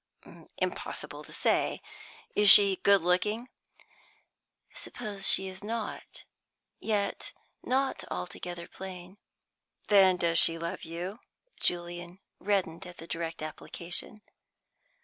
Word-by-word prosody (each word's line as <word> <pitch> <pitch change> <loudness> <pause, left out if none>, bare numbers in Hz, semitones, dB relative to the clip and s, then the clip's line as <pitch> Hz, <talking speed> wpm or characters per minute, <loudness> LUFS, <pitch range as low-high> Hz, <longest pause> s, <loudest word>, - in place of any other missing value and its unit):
"Impossible - - -4
to - - -13
say. - - 0 0.6
Is 205 -1 +6
she 195 -1 +9
good 200 -1 +4
looking?" 210 +7 0 1.2
"Suppose 205 -5 -4
she 190 - +3
is 190 +1 -9
not; 225 +1 -6 0.5
yet 210 -2 -2 0.3
not 265 +1 -1
altogether 175 -1 -6
plain." 185 +1 -10 0.7
"Then 190 -3 +6
does 170 -2 +2
she 165 - +5
love 170 0 -5
you?" 175 +6 -6 0.4
Julian 175 0 -3 0.2
reddened 185 -5 -1
at 180 - -12
the 165 - -10
direct 165 -1 -5
application. 175 +6 -4
185 Hz, 105 wpm, -29 LUFS, 175-205 Hz, 1.2 s, she